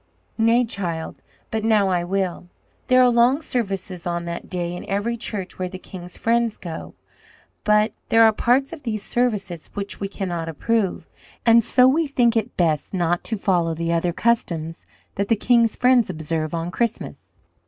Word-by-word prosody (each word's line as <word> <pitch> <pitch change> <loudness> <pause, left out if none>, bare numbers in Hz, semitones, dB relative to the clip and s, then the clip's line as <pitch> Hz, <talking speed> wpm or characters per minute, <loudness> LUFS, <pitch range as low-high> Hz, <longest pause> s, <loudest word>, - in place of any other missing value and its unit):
"Nay, 230 +2 +4
child, 175 -7 -5 0.3
but 220 -1 -2
now 215 -3 +3
I 175 -2 +1
will. 185 -1 -2 0.4
There 255 0 +6
are 250 - +6
long 240 +4 +4
services 195 - -3
on 170 0 -2
that 170 0 -6
day 175 -1 -3
in - - -7
every 205 +4 -1
church 205 -6 -5
where 185 0 -2
the 185 - -7
king's 180 -1 -10
friends 230 -1 +1
go. 165 -3 -8 0.7
But 210 +1 +3 0.2
there 225 0 +6
are 220 -1 +6
parts 260 +7 +1
of 325 - -9
these 215 -5 -3
services 205 -10 -2
which 200 0 -4
we 200 - -2
cannot 175 -4 -4
approve; 205 +4 -1 0.4
and 230 0 +6
so 250 +3 +4
we 310 +4 +2
think 240 -4 +2
it 225 +2 -1
best 160 0 0
not 175 -1 0
to 225 - -2
follow 175 -4 +1
the 170 +1 -1
other 170 +1 +1
customs 170 -6 -1 0.3
that 200 0 0
the 225 - +3
king's 230 +1 +3
friends 250 -4 +3
observe 155 -1 -3
on 165 +1 -3
Christmas. 235 +2 -4
200 Hz, 175 wpm, -22 LUFS, 175-235 Hz, 0.7 s, There